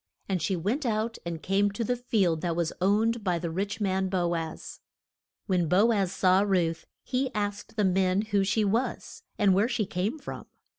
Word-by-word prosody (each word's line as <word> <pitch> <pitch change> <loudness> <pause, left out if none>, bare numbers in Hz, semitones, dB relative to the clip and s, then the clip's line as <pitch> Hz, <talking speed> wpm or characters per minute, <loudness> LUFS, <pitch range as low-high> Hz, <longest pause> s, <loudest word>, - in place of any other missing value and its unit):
And 185 -3 -1
she 190 +4 0
went 210 - -1
out 225 -1 -1
and 165 -2 -5
came 200 +2 +2
to 230 - -2
the 245 +3 0
field 200 -10 +1
that 170 -2 -1
was 170 -1 -1
owned 220 +4 +2
by 180 -3 +1
the 170 0 -4
rich 200 +5 -3
man, 190 -2 0
Bo 175 -2 0
az. 160 -1 -6 0.7
When 180 -4 +1
Bo 200 +8 +4
az 195 -5 +1
saw 185 0 +3
Ruth 175 -5 0 0.2
he 260 +1 -1
asked 205 0 -3
the 210 -2 +2
men 190 +1 +2
who 205 -2 +1
she 210 +2 +1
was, 225 +6 -2 0.2
and 205 -4 +4
where 205 +5 +2
she 230 -4 0
came 195 - -2
from. 285 - -8
195 Hz, 195 wpm, -28 LUFS, 180-215 Hz, 0.7 s, Bo